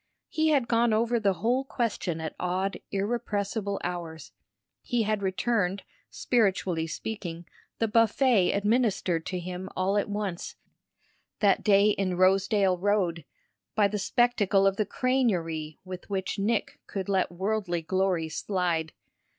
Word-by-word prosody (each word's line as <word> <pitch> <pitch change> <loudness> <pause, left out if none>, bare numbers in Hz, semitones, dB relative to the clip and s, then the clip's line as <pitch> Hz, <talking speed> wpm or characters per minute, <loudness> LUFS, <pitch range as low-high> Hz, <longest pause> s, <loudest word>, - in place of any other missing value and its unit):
He 315 0 +1
had 280 -6 +3
gone 230 -1 +3
over 235 +2 +2
the 200 -3 +2
whole 250 +3 +2
question 225 -10 -2
at 160 -1 -4
odd, 185 +2 -1
irrepressible 200 -1 -2
hours; 170 -2 -5 0.5
he 240 -4 0
had 215 -1 -1
returned, 195 0 0 0.3
spiritually 190 -8 0
speaking, 175 -2 -5 0.3
the 225 - +1
buffet 230 -1 +3
administered 200 -6 +1
to 185 - -2
him 180 +1 -6
all 195 +2 +2
at 205 - -3
once, 200 -4 -4 0.8
that 200 -3 +3
day 200 0 +5
in 190 -3 -1
Rosedale 190 0 +3
Road, 180 -5 0 0.5
by 210 -2 +4
the 210 +1 -3
spectacle 205 -3 +2
of 195 0 +2
the 215 - 0
crânerie 175 - 0
with 185 +1 -8
which 190 0 -2
Nick 215 +2 -1
could 195 -1 -4
let 190 -3 +1
worldly 190 -2 -2
glories 175 -2 0
slide. 175 -5 -1
195 Hz, 135 wpm, -27 LUFS, 180-220 Hz, 0.8 s, day